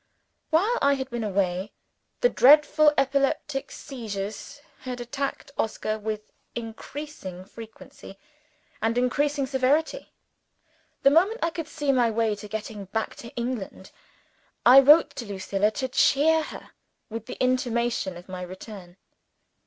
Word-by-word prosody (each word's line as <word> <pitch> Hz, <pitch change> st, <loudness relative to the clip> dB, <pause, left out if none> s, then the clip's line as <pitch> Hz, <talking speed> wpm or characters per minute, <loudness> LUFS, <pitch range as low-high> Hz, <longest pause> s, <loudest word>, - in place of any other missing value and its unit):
While 405 Hz, +10 st, +2 dB
I 280 Hz, 0 st, +4 dB
had 265 Hz, -1 st, -5 dB
been 235 Hz, -1 st, -3 dB
away, 195 Hz, -1 st, -1 dB, 0.5 s
the -, -, +5 dB
dreadful 300 Hz, -, +6 dB
epileptic 275 Hz, +1 st, 0 dB
seizures 220 Hz, +1 st, -6 dB, 0.2 s
had 250 Hz, -1 st, -6 dB
attacked 270 Hz, +3 st, -4 dB
Oscar 215 Hz, 0 st, -2 dB
with 215 Hz, 0 st, -3 dB, 0.3 s
increasing 225 Hz, -, -7 dB
frequency 220 Hz, -2 st, -12 dB, 0.6 s
and 225 Hz, +2 st, 0 dB
increasing 280 Hz, +3 st, +1 dB
severity. 285 Hz, -, 0 dB, 0.9 s
The 275 Hz, -, +6 dB
moment 385 Hz, +10 st, +3 dB
I 335 Hz, -, +1 dB
could 325 Hz, -2 st, -5 dB
see 295 Hz, -3 st, -1 dB
my 245 Hz, -3 st, +3 dB
way 225 Hz, -1 st, +1 dB
to 210 Hz, +1 st, -8 dB
getting 210 Hz, -1 st, -6 dB
back 220 Hz, +4 st, -3 dB
to 235 Hz, -, -9 dB
England, 235 Hz, -6 st, -5 dB, 0.7 s
I 255 Hz, +3 st, +10 dB
wrote 295 Hz, +4 st, +6 dB
to 240 Hz, -, -4 dB
Lucilla 200 Hz, +1 st, 0 dB
to 260 Hz, +4 st, -3 dB
cheer 305 Hz, +5 st, +3 dB
her -, -, -10 dB, 0.4 s
with 225 Hz, 0 st, -6 dB
the -, -, -7 dB
intimation 240 Hz, -6 st, 0 dB
of 175 Hz, -, -13 dB
my 185 Hz, -1 st, -7 dB
return. 185 Hz, 0 st, -10 dB
240 Hz, 130 wpm, -26 LUFS, 210-280 Hz, 0.9 s, I